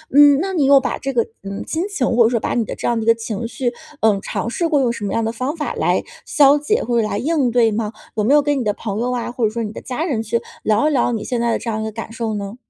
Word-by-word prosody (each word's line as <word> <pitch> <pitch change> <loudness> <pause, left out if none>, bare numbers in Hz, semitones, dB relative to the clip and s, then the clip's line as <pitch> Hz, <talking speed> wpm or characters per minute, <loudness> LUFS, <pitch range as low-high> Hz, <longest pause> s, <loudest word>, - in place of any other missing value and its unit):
嗯， 290 -1 +8
那 385 +3 -2
你 310 -6 +2
有 275 0 +7
把 260 - -3
这 275 - -3
个， 235 -3 +2 0.2
嗯， 195 0 -5
心 325 +2 -2
情， 330 -11 -1
或 235 - +6
者 225 - +4
说 235 - 0
把 - - -2
你 235 - +1
的 - - -5
这 - - -3
样 240 - +1
的 - - -3
一 - - -5
个 230 - +5
情 225 0 -4
绪， 245 +1 -2 0.3
嗯， 210 -3 +3
尝 230 - -3
试 335 +7 -1
过 300 -3 +2
用 240 -2 +2
什 205 -3 -5
么 - - -2
样 230 - 0
的 225 - -1
方 255 +7 -3
法 300 - -3
来 - - +1 0.2
消 285 0 +5
解 360 +11 0
或 240 -1 +1
者 215 - -1
来 205 - -2
应 280 0 +1
对 230 -2 +3
吗？ 215 0 -2 0.2
有 215 - 0
没 260 - +3
有 295 - +6
跟 290 -1 0
你 - - -1
的 210 -2 0
朋 210 -1 -4
友 250 +1 -1
啊， 240 -1 -3
或 245 -1 -4
者 215 - +2
说 230 +1 -3
你 210 - -4
的 - - -8
家 260 +5 -3
人 275 -10 -1
去 230 +2 -1 0.2
聊 220 +8 +2
一 - - -1
聊 245 -3 +2
你 220 -3 -3
现 245 - -2
在 235 -1 +1
这 235 - -5
样 220 -1 -2
一 - - -3
个 220 - -4
感 225 +1 -7
受 230 -2 -3
呢？ 200 +2 -5
235 Hz, 345 characters per minute, -19 LUFS, 220-275 Hz, 0.3 s, 嗯